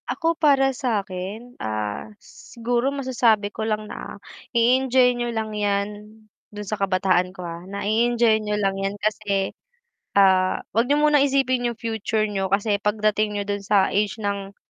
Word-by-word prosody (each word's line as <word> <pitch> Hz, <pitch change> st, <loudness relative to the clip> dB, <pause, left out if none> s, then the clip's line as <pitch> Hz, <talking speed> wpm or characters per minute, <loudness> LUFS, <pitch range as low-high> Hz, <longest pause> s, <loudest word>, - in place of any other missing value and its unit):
Ako 330 Hz, 0 st, 0 dB
para 275 Hz, -3 st, +3 dB
sa 235 Hz, -6 st, -1 dB
akin, 195 Hz, +7 st, -7 dB
ah, 105 Hz, -, -3 dB
siguro 240 Hz, +2 st, -3 dB
masasabi 240 Hz, -7 st, +1 dB
ko -, -, -6 dB
lang 215 Hz, -1 st, -1 dB
na -, -, -8 dB, 0.4 s
i-enjoy 250 Hz, +1 st, +4 dB
niyo 240 Hz, 0 st, -3 dB
lang 220 Hz, -2 st, -3 dB
yan 205 Hz, -1 st, 0 dB, 0.6 s
dun 210 Hz, -1 st, -8 dB
sa 215 Hz, -, -1 dB
kabataan 185 Hz, -1 st, +2 dB
ko, 180 Hz, -, -7 dB
ah, 170 Hz, 0 st, -6 dB
na 200 Hz, +1 st, -5 dB
i-enjoy 230 Hz, 0 st, +2 dB
niyo 210 Hz, 0 st, -2 dB
lang 195 Hz, -2 st, 0 dB
yan 195 Hz, +1 st, -2 dB
kasi, 205 Hz, -2 st, -1 dB, 0.6 s
ah, 190 Hz, -2 st, +4 dB
wag 230 Hz, +3 st, +2 dB
niyo 290 Hz, +2 st, +3 dB
muna 300 Hz, -1 st, +5 dB
isipin 265 Hz, -3 st, +2 dB
yung 235 Hz, -2 st, -4 dB
future 220 Hz, -1 st, -1 dB
niyo 195 Hz, -2 st, -1 dB
kasi 200 Hz, +2 st, +1 dB
pagdating 210 Hz, 0 st, 0 dB
niyo 205 Hz, -, -1 dB
dun 205 Hz, 0 st, -3 dB
sa 200 Hz, -1 st, +2 dB
age 205 Hz, 0 st, 0 dB
ng 200 Hz, -1 st, -3 dB
210 Hz, 165 wpm, -23 LUFS, 200-240 Hz, 0.6 s, muna